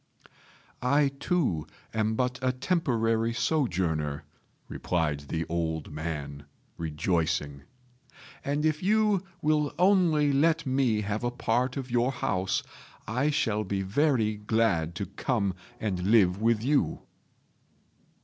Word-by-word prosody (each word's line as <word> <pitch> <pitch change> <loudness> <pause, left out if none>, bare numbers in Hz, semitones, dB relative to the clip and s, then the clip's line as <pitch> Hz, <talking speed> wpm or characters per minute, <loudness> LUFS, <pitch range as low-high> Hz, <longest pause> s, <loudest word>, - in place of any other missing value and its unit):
"I, 140 +3 +3
too, 135 - 0 0.3
am 110 0 0
but 125 +1 -1
a 130 0 +2
temporary 115 -6 0
sojourner," 85 - 0 0.4
replied 80 -5 -1
the 80 0 -2
old 80 -2 -2
man, 75 -2 -5 0.3
rejoicing; 80 -3 -1 0.8
"and 145 +2 -1
if 155 -1 +1
you 210 0 +3 0.2
will 150 -1 +1
only 170 -6 +4
let 165 +3 +2
me 130 -5 +1
have 105 +2 -3
a 120 - +1
part 125 +1 0
of 130 -2 -5
your 120 +2 +2
house, 95 -7 -1 0.4
I 125 +7 +1
shall 110 -8 0
be 95 0 -2
very 110 0 +1
glad 105 -6 +1
to 100 - -3
come 100 0 -1 0.3
and 100 -5 -2
live 95 0 +3
with 115 -1 +2
you." 140 +2 +1
115 Hz, 120 wpm, -28 LUFS, 90-140 Hz, 0.8 s, only